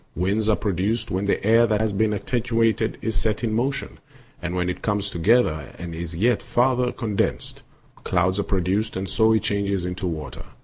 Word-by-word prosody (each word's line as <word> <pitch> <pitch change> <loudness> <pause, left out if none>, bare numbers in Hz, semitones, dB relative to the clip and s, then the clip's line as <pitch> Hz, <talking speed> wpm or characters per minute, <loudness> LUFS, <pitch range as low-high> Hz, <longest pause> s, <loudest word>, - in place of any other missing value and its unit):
Winds 100 +5 0
are 110 - +4
produced 105 +5 -1
when 95 +2 -1
the 100 - 0
air 115 +2 +5
that 105 -2 +1
has 110 -2 0
been 110 +2 +2
attenuated 115 0 0
is 110 - -1
set 105 +2 0
in 110 -2 0
motion; 135 +5 -2 0.4
and 90 0 -3
when 90 0 0
it 90 - -3
comes 105 -1 -1
together 85 - +2
and 85 +1 -6
is 85 0 -5
yet 115 +6 +2
farther 125 0 +1
condensed, 105 -5 -2 0.4
clouds 90 +2 +1
are - - -3
produced, 95 +4 0
and 95 +1 -3
so 110 +3 +3
it 110 -3 +2
changes 100 -3 -1
into 90 +1 -3
water. 75 -4 -6
105 Hz, 185 wpm, -23 LUFS, 90-115 Hz, 0.4 s, air